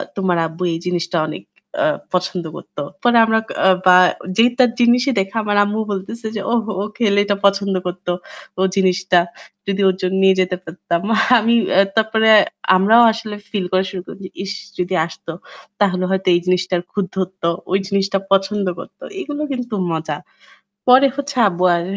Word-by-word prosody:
"তোমার 190 Hz, -3 st, 0 dB
আব্বু 165 Hz, +3 st, -7 dB
এই 165 Hz, -, -3 dB
জিনিসটা 175 Hz, 0 st, -2 dB
আ -, -, +1 dB
অনেক 155 Hz, -, -7 dB, 0.4 s
আ -, -, +3 dB, 0.3 s
পছন্দ 180 Hz, -1 st, -1 dB
করত।" -, -, -13 dB, 0.3 s
পরে 240 Hz, -1 st, +4 dB
আমরা 225 Hz, 0 st, +2 dB
কা -, -, -6 dB, 0.3 s
বা 180 Hz, -, +7 dB, 0.4 s
যে 225 Hz, -, +6 dB, 0.2 s
তার 250 Hz, -1 st, +6 dB
জিনিসই 245 Hz, +3 st, +3 dB
দেখা 195 Hz, +3 st, -3 dB
আমার 205 Hz, -1 st, 0 dB
আম্মু 205 Hz, +2 st, -2 dB
বলতেছে 220 Hz, +4 st, -5 dB
যে, 205 Hz, -, -3 dB
"ওহ 230 Hz, -2 st, +1 dB, 0.2 s
ও -, -, -1 dB
খেলে 205 Hz, -4 st, +2 dB
এটা 205 Hz, 0 st, 0 dB
পছন্দ 200 Hz, 0 st, +2 dB
করত। 180 Hz, +1 st, -7 dB, 0.5 s
ও -, -, +1 dB
জিনিসটা 185 Hz, -1 st, +2 dB, 0.5 s
যদি 200 Hz, 0 st, -1 dB
ওর 185 Hz, -, 0 dB
জন্য 185 Hz, +1 st, -1 dB
নিয়ে 190 Hz, 0 st, +5 dB
যেতে 180 Hz, 0 st, -1 dB
পারতাম।" 170 Hz, 0 st, -3 dB, 0.4 s
আমি 230 Hz, +2 st, +2 dB, 0.2 s
এ -, -, +8 dB, 0.2 s
তারপরে 220 Hz, 0 st, +2 dB, 0.5 s
আমরাও 215 Hz, +6 st, +5 dB
আসলে 220 Hz, -2 st, -6 dB
ফিল 200 Hz, -4 st, -2 dB
করা 185 Hz, 0 st, +2 dB
শুরু 190 Hz, -2 st, -5 dB
করি -, -, -9 dB
যে -, -, -8 dB
ইশ 195 Hz, +1 st, -4 dB, 0.3 s
যদি 180 Hz, +1 st, -2 dB
আসত 165 Hz, -, -13 dB, 0.5 s
তাহলে 185 Hz, -2 st, +2 dB
হয়তো 190 Hz, 0 st, -1 dB
এই -, -, +3 dB
জিনিসটার 180 Hz, -1 st, 0 dB
খুত 200 Hz, -2 st, -1 dB
ধরতো। 185 Hz, -2 st, -2 dB, 0.2 s
ঐ -, -, -1 dB
জিনিসটা 195 Hz, -1 st, 0 dB
পছন্দ 195 Hz, +1 st, +1 dB
করত। -, -, -12 dB, 0.2 s
এগুলো 295 Hz, -4 st, -5 dB
কিন্তু 250 Hz, -3 st, -4 dB, 0.2 s
মজা। 160 Hz, -2 st, -3 dB, 0.7 s
পরে 260 Hz, +2 st, +7 dB
হচ্ছে 280 Hz, -1 st, -5 dB
আব্বু 180 Hz, 0 st, -3 dB
আর 170 Hz, -, -2 dB
195 Hz, 180 wpm, -18 LUFS, 185-220 Hz, 0.7 s, এ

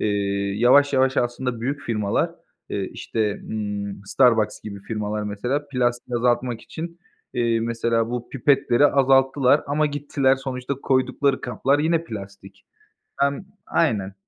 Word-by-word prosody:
Eee, 100 Hz, -1 st, 0 dB
yavaş 140 Hz, +5 st, +5 dB
yavaş 130 Hz, +1 st, +2 dB
aslında 120 Hz, -1 st, -1 dB
büyük 140 Hz, +4 st, -2 dB
firmalar, 105 Hz, -5 st, 0 dB, 0.4 s
eee, -, -, -2 dB
işte, 105 Hz, -2 st, -2 dB
ımm, 105 Hz, -2 st, -4 dB
Starbucks 115 Hz, 0 st, +3 dB
gibi 100 Hz, -2 st, -8 dB
firmalar 105 Hz, 0 st, -3 dB
mesela, 120 Hz, +8 st, -2 dB
plastiği 120 Hz, -1 st, -1 dB
azaltmak 120 Hz, -1 st, 0 dB
için, 170 Hz, +1 st, -8 dB, 0.4 s
eee, 115 Hz, -2 st, +1 dB
mesela 115 Hz, 0 st, 0 dB
bu 120 Hz, -1 st, -4 dB
pipetleri 135 Hz, 0 st, +3 dB
azalttılar 135 Hz, 0 st, +4 dB
ama 150 Hz, +2 st, +1 dB
gittiler 145 Hz, -2 st, +1 dB
sonuçta 130 Hz, 0 st, -4 dB
koydukları 130 Hz, +1 st, +1 dB
kaplar 135 Hz, +3 st, 0 dB
yine 165 Hz, +2 st, +1 dB
plastik. 100 Hz, -4 st, -10 dB, 0.5 s
Hem 140 Hz, +6 st, 0 dB, 0.2 s
Aynen. 100 Hz, -4 st, 0 dB
120 Hz, 125 wpm, -23 LUFS, 105-135 Hz, 0.5 s, yavaş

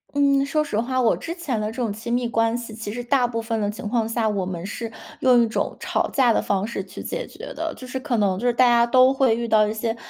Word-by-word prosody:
嗯， 280 Hz, -1 st, +3 dB
说 305 Hz, +2 st, 0 dB
实 215 Hz, -, -4 dB
话， 255 Hz, +2 st, -1 dB
我 235 Hz, -, +3 dB
之 335 Hz, -, -6 dB
前 275 Hz, -11 st, -2 dB
的 215 Hz, -, -1 dB
这 220 Hz, -, -7 dB
种 235 Hz, -5 st, -1 dB
亲 230 Hz, +3 st, -6 dB
密 245 Hz, -1 st, 0 dB
关 225 Hz, 0 st, +1 dB
系 235 Hz, -2 st, -8 dB
其 215 Hz, -2 st, -6 dB
实 245 Hz, +1 st, -5 dB
大 250 Hz, -1 st, +2 dB
部 230 Hz, -1 st, -3 dB
分 225 Hz, 0 st, -2 dB
的 205 Hz, -1 st, 0 dB
情 210 Hz, 0 st, -6 dB
况 225 Hz, -1 st, 0 dB
下， 225 Hz, -1 st, 0 dB
我 200 Hz, -3 st, -1 dB
们 180 Hz, -1 st, -5 dB
是 225 Hz, +2 st, -5 dB, 0.3 s
用 250 Hz, -2 st, +5 dB
一 -, -, +2 dB
种 220 Hz, -, -2 dB
吵 -, -, -1 dB
架 250 Hz, -4 st, +4 dB
的 -, -, +1 dB
方 200 Hz, 0 st, 0 dB
式 235 Hz, -, -4 dB
去 -, -, -10 dB
解 -, -, -4 dB
决 -, -, -9 dB
的。 325 Hz, 0 st, -3 dB
就 255 Hz, -, -10 dB
是 260 Hz, +1 st, -4 dB
可 260 Hz, -3 st, -1 dB
能 200 Hz, -4 st, +1 dB
就 235 Hz, -, -3 dB
是 -, -, +3 dB
大 250 Hz, +2 st, +4 dB
家 235 Hz, -1 st, +5 dB
都 255 Hz, +2 st, +5 dB
会 260 Hz, -4 st, +3 dB
遇 235 Hz, 0 st, -2 dB
到 215 Hz, -2 st, +4 dB
一 -, -, -1 dB
些 225 Hz, +1 st, -2 dB
235 Hz, 310 characters per minute, -23 LUFS, 220-255 Hz, 0.3 s, 用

